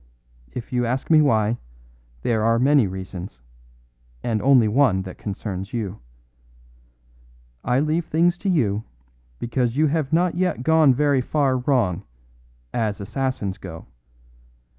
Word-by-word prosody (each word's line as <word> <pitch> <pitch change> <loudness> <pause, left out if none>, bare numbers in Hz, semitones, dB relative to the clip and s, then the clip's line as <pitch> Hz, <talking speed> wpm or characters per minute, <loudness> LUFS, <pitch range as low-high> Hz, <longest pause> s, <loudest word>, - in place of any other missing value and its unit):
If 120 +1 -7
you 125 0 +1
ask 125 +6 -2
me 155 -1 +7
why, 115 -5 +2 0.6
there 110 -2 +1
are 115 +1 +3
many 135 -2 +4
reasons, 95 -8 -8 0.8
and 110 -3 -1
only 130 -4 +5
one 105 -5 +3
that 95 -1 -10
concerns 95 -1 -5
you. 105 -4 -4 1.6
I 125 +1 +1
leave 155 +2 0
things 170 +2 +2
to 200 - -2
you 110 - +1 0.5
because 120 - -1
you 155 - +4
have 155 -1 0
not 175 +2 +2
yet 175 -7 -1
gone 160 -3 +5
very 140 -1 +2
far 135 0 +1
wrong, 125 - +1 0.7
as 110 -3 -1
assassins 110 -2 -3
go. 80 -4 -9
125 Hz, 130 wpm, -23 LUFS, 105-145 Hz, 1.6 s, me